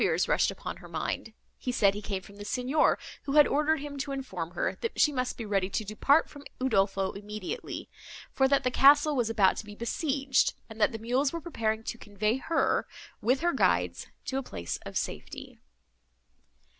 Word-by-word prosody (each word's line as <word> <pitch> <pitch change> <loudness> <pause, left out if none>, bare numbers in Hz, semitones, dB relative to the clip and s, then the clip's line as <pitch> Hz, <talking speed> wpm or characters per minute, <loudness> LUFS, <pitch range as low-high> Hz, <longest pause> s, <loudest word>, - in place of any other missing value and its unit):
New - - +4
fears - - +1
rushed - - +3
upon - - -6
her - - -12
mind. 225 - -3 0.3
He 250 - -2
said 200 -5 +4
he 205 - -5
came 195 -2 -4
from 200 +2 -14
the 205 - -7
Signor, 255 +7 +2 0.3
who 275 - -2
had 295 -1 +8
ordered 300 +1 +1
him 285 -1 -6
to 275 +1 -3
inform 190 -12 -4
her, - - -1
that 460 - -3
she 300 - +5
must 255 -2 -2
be 230 - -5
ready 195 -2 0
to 220 - -1
depart 275 +9 +3
from 285 -1 -12 0.2
Udolpho 195 -6 +1
immediately, 210 -1 -6 0.4
for 265 - +3
that 275 0 +3
the 255 - +1
castle 290 +3 +6
was 240 -4 +1
about 210 -4 +3
to - - -4
be 210 0 -10
besieged; 275 +3 +1
and 220 0 -9
that 225 +1 +2
mules 255 +5 +1
were 335 - -3
preparing 225 -9 -2
to 235 - -5
convey 210 +3 -1
her, 325 +5 +1 0.3
with 250 +6 +2
her 345 0 +2
guides, - - +1 0.2
to 265 - -1
a - - -2
place 85 - -5
of - - -4
safety. - - -5
250 Hz, 195 wpm, -29 LUFS, 210-280 Hz, 0.4 s, had